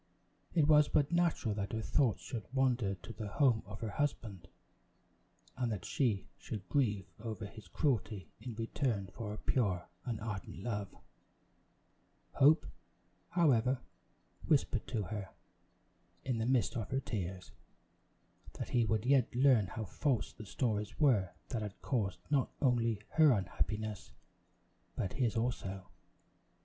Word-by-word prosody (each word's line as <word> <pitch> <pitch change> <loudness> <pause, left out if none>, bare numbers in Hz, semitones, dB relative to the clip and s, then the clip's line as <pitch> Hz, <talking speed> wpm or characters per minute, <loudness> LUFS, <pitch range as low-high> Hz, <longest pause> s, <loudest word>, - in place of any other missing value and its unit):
It 155 -4 +5
was 150 -1 +7
but 145 +1 +2
natural 170 -10 +2
that 100 0 -3
her 110 - -1
thoughts 130 -3 +2
should 115 -4 -5
wander 125 -7 +2
to 95 +5 -10
the 110 -2 -5
home 115 +1 +3
of 105 +1 -8
her 110 -2 -2
husband, 110 -8 -2 1.1
and 125 -2 -1
that 105 - -4
she 115 -8 0
should 100 -5 -6
grieve 105 -9 +1
over 110 -1 -5
his 105 -2 -11
cruelty 105 - 0
in 120 -3 -6
return 115 -3 -1
for 115 -2 -5
her 105 - -5
pure 100 -10 0 0.2
and 115 -3 -3
ardent 100 -4 -5
love. 105 -4 -2 1.4
Hope, 150 +4 +5 0.6
however, 130 -7 +3 0.7
whispered - - +2
to 110 - -1
her, 100 -1 -5 1.0
in 125 -3 0
the 110 - 0
midst 125 -1 +2
of 110 -5 -3
her 135 - +1
tears, 95 -7 -4 1.0
that - - -5
he 120 - +3
would 110 0 0
yet 130 -2 +3
learn 125 -6 +5
how 110 +4 -5
false 125 - 0
the 110 - -10
stories 105 -1 -1
were 120 - +4 0.2
that 115 -4 -2
had 105 -2 -6
caused 100 -9 -1
not 140 -3 +3
only 115 -5 +2
her 155 -2 +6
unhappiness, 105 - -2 0.8
but 95 - -2
his 120 -4 +1
also. 100 -5 -2
115 Hz, 140 wpm, -34 LUFS, 105-130 Hz, 1.4 s, was